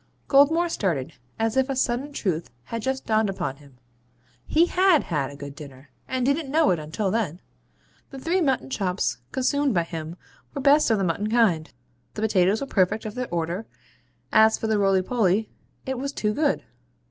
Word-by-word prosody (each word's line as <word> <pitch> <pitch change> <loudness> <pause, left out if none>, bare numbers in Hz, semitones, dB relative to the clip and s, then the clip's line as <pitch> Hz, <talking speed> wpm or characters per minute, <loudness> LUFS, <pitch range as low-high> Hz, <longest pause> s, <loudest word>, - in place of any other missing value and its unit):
Goldmore 310 +5 +4
started, 170 - -2 0.2
as 225 0 0
if 265 +1 +2
a 270 - -1
sudden 255 +3 -1
truth 175 - -2
had 230 - -5
just 265 +3 -2
dawned 220 -1 +2
upon 140 -8 -3
him. 140 -3 -19 0.7
He 325 +2 +4
HAD 365 -3 +3
had 150 -5 -2
a 140 - -10
good 140 0 -8
dinner; 140 -2 -12 0.2
and 255 -1 -1
didn't 280 +1 0
know 310 +2 +3
it 175 - 0
until 165 +6 -2
then. 185 -7 -1 0.7
The 270 - -9
three 340 +7 0
mutton 270 -3 0
chops 180 - -1
consumed 275 -1 +1
by 170 - +3
him 165 0 -6 0.4
were 280 - -3
best 285 +1 +5
of 225 - +3
the 195 - 0
mutton 190 +4 -1
kind; 215 -9 +2 0.4
the - - -4
potatoes 200 -1 +2
were - - -2
perfect 210 -3 +1
of 215 - -5
their 250 +1 -4
order; 170 +5 -3 0.6
as 220 0 +5
for - - -5
the 220 -1 +1
rolypoly, 195 +1 +2 0.4
it 265 -1 -3
was 280 +1 -3
too 210 -6 -1
good. 295 +3 0
220 Hz, 180 wpm, -24 LUFS, 175-265 Hz, 0.7 s, best